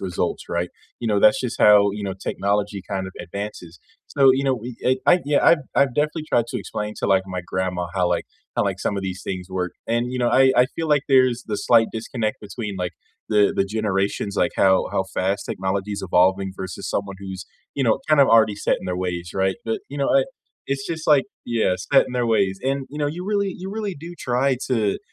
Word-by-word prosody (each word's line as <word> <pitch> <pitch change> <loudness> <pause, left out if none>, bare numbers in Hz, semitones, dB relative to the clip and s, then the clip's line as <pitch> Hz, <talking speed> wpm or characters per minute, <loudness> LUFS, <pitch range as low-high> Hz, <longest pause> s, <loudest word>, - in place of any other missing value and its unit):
results, 90 -3 -2
right?" 85 +1 -1 0.3
You 115 - -2
know, 105 -2 +2
that's 105 - +5
just 125 -2 -4
how, 105 -1 +7
you 105 +1 -5
know, 95 -2 -3
technology 100 +1 -2
kind 95 -2 -2
of 95 - -9
advances. 90 -3 -7 0.3
So, 135 -2 +5
you 135 +1 0
know, 135 -1 +2
we 120 0 -7
eh, 130 +1 +3
I 180 0 +6
yeah, 145 0 +2
I've 170 - +6 0.2
I've 135 -3 +3
definitely 150 +3 0
tried 120 -1 +2
to - - -3
explain 105 0 -5
to, - - -1
like, 95 -1 +3
my 90 -1 -4
grandma 90 -1 -2
how, 90 -2 +2
like, 85 -1 0 0.3
how, - - +3
like, 95 -2 -2
some 100 - -1
of 100 - -3
these 95 -1 -5
things 90 -1 -5
work, 90 -1 -2
and, 120 +2 0
you 130 - -3
know, 120 -1 +2
I 130 +2 +5
I 125 - +6
feel 165 -1 -2
like 145 -2 +3
there's 130 -3 +3
the 105 -2 -2
slight 115 0 +4
disconnect 110 -1 -3
between, 105 0 -6
like, 90 -1 -2 0.4
the 105 -2 +4
the 95 - +2
generations, 100 -1 -1
like, 90 - +1
how 95 -1 +3
how 95 - +1
fast 95 +2 0
technology 95 +2 -2
is 100 - -4
evolving 95 +1 +2
versus 95 -3 -6
someone 100 -1 -3
who's, 95 -2 -7 0.3
you 135 - 0
know, 115 - +2
kind 155 -2 +5
of 140 - +6
already 110 -2 +5
set - - +1
in - - -9
their 90 -1 -2
ways, 90 -2 -3
right? 95 -1 +1
But, 110 -1 -2
you 145 - -7
know, 140 - +1
I 135 - +4 0.5
it's 135 0 -2
just 160 -1 -5
like 145 -3 +5 0.2
Yeah, 115 -6 +1 0.2
set 135 - +6
in - - -8
their 125 -1 0
ways. 100 -4 +1
And, 135 0 -1
you 150 - -7
know, 145 - 0
you 170 +5 -4
really 200 -2 0
you 190 +2 -7
really 210 -2 -3
do 170 +4 -9
try 125 +2 +1
to 110 -6 0
105 Hz, 230 wpm, -22 LUFS, 95-130 Hz, 0.5 s, how